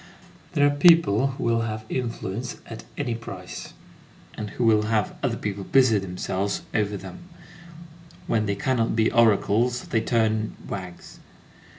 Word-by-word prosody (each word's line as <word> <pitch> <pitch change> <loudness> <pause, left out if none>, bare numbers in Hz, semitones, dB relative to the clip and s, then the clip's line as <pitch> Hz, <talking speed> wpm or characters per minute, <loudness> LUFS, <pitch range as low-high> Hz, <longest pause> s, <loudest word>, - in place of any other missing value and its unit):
There 145 - +4
are 145 - +4
people 145 - +5
who 135 0 -5
will 115 0 +2
have 110 -1 -4
influence 120 -1 -4
at 115 -1 -9
any 130 -5 -1
price, 100 -6 -8 0.6
and 105 -1 -5
who 120 - -3
will 105 -1 +4
have 110 -3 0
other - - 0
people 100 -1 -4
busy 125 -2 +4
themselves 95 +1 -3
over 105 -2 0
them; 95 -1 -9 1.1
when 110 -2 0
they 100 - 0
cannot 115 +2 0
be 110 -1 +2
oracles, 115 +2 +3
they 110 - +1
turn 110 -2 0
wags. 90 -3 -8
110 Hz, 145 wpm, -25 LUFS, 100-120 Hz, 1.1 s, people